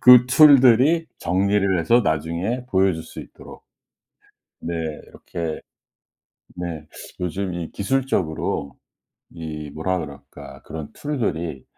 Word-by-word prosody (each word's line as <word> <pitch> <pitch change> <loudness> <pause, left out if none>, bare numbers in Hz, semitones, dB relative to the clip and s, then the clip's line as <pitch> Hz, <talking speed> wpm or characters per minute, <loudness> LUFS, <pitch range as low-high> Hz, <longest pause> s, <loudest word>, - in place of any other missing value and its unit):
그 125 -1 +8
툴들이 140 +3 +6
정리를 95 +1 +1
해서 115 +9 +4
나중에 85 - -1
보여줄 95 -7 +1
수 - - -10
있도록. - - -13 1.0
네 85 - -5 0.3
이렇게 80 -2 -6 1.0
네. 85 -3 -5 0.3
요즘, 90 +1 -3
이 85 -2 -5
기술적으로 95 - -1 0.5
이 75 -3 -7
뭐라 90 +5 -2
그럴까? 70 -3 -10
그런 80 -2 -8
툴들이 85 - -3
90 Hz, 220 characters per minute, -22 LUFS, 80-120 Hz, 1.0 s, 그